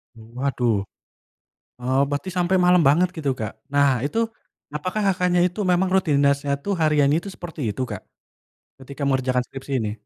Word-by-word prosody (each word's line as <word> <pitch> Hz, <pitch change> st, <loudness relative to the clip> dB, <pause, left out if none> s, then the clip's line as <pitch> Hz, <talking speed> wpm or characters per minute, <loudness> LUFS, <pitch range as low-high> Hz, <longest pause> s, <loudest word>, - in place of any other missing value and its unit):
Waduh. 115 Hz, -2 st, -2 dB, 0.9 s
Oh, 130 Hz, +2 st, +1 dB
berarti 145 Hz, +6 st, -3 dB
sampai 180 Hz, +1 st, +2 dB
malam 180 Hz, -1 st, +5 dB
banget 170 Hz, +6 st, +4 dB
gitu, 145 Hz, -4 st, -1 dB
Kak? 110 Hz, -2 st, -4 dB, 0.2 s
Nah 140 Hz, 0 st, +4 dB, 0.2 s
itu, 150 Hz, +11 st, -2 dB, 0.6 s
apakah 185 Hz, +8 st, -2 dB
Kakaknya 180 Hz, -2 st, +2 dB
itu 180 Hz, +4 st, -5 dB
memang 180 Hz, +1 st, +2 dB
rutinitasnya 140 Hz, -5 st, +2 dB
itu 200 Hz, -, -5 dB
hariannya 150 Hz, -2 st, +3 dB
itu 200 Hz, -, -7 dB
seperti 170 Hz, -3 st, -8 dB
itu, 105 Hz, +5 st, -4 dB
Kak? 105 Hz, -3 st, -6 dB, 0.8 s
Ketika 140 Hz, +2 st, -10 dB
mengerjakan 130 Hz, -2 st, +1 dB
skripsi 135 Hz, +1 st, -9 dB
ini. 105 Hz, -, -2 dB
145 Hz, 150 wpm, -23 LUFS, 130-180 Hz, 0.9 s, malam